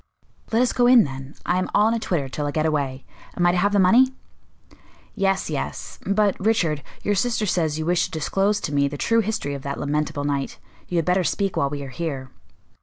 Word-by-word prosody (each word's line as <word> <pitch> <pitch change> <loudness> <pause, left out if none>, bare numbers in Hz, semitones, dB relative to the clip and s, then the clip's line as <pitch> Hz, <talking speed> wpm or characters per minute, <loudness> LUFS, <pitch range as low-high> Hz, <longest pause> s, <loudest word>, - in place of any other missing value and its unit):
"Let 230 +2 +3
us 250 - 0
go 245 -1 +3
in, 245 -2 +7
then. 135 0 -7
I 180 - +1
am 185 - -2
all 210 +1 +5
in - - +1
a 230 - 0
twitter 165 -10 -1
till 145 +2 -3
I - - -1
get 155 +1 0
away. 140 -4 -1 0.3
Am 175 - +2
I 175 - +5
to 180 - 0
have 200 +3 +2
the 205 - +2
money?" 230 +7 +6 1.1
"Yes, 195 -1 0
yes. 150 -3 -5
But, 200 0 +2
Richard, 170 -9 +1 0.2
your 205 - +1
sister 225 +2 0
says 160 -6 0
you 155 - -3
wish 175 0 +2
to - - -7
disclose 195 +6 0
to 145 - -4
me 140 0 +3
the 145 +1 -5
true 230 +8 +2
history 215 -9 -2
of 140 - -5
that 140 +1 -4
lamentable 145 0 -1
night. 140 -1 -2 0.3
You 180 - -4
had 165 - +1
better 180 +1 +2
speak 195 +2 -1
while 140 - +1
we 145 0 -5
are 135 - -7
here." 135 -2 -5
170 Hz, 230 wpm, -23 LUFS, 145-205 Hz, 1.1 s, in